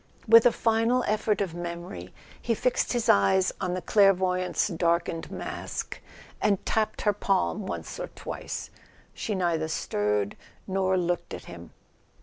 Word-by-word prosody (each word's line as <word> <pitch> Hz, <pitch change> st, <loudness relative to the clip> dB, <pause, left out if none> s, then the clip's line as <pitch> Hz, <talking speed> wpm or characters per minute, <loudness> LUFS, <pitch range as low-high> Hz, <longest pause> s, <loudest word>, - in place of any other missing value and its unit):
With 230 Hz, +1 st, +8 dB
a -, -, +4 dB
final 230 Hz, +3 st, +2 dB
effort 210 Hz, -1 st, 0 dB
of 185 Hz, -5 st, -2 dB
memory 170 Hz, -, -6 dB, 0.3 s
he 230 Hz, -, 0 dB
fixed 250 Hz, +3 st, 0 dB
his 240 Hz, -2 st, -1 dB
eyes 100 Hz, -, +4 dB
on 180 Hz, -1 st, -1 dB
the 185 Hz, -, -4 dB
clairvoyant^s 185 Hz, -2 st, +2 dB
darkened 170 Hz, 0 st, 0 dB
mask, -, -, -5 dB, 0.4 s
and 200 Hz, -3 st, +1 dB
tapped 220 Hz, -1 st, 0 dB
her 210 Hz, -, +3 dB
palm 195 Hz, 0 st, 0 dB
once -, -, -5 dB
or -, -, -3 dB
twice. -, -, -6 dB, 0.4 s
She 210 Hz, -, -3 dB
neither 170 Hz, -4 st, 0 dB
stirred 105 Hz, -8 st, -1 dB, 0.3 s
nor 190 Hz, -1 st, +1 dB
looked 175 Hz, -1 st, -1 dB
at -, -, -10 dB
him. -, -, -10 dB
185 Hz, 140 wpm, -27 LUFS, 170-215 Hz, 0.4 s, With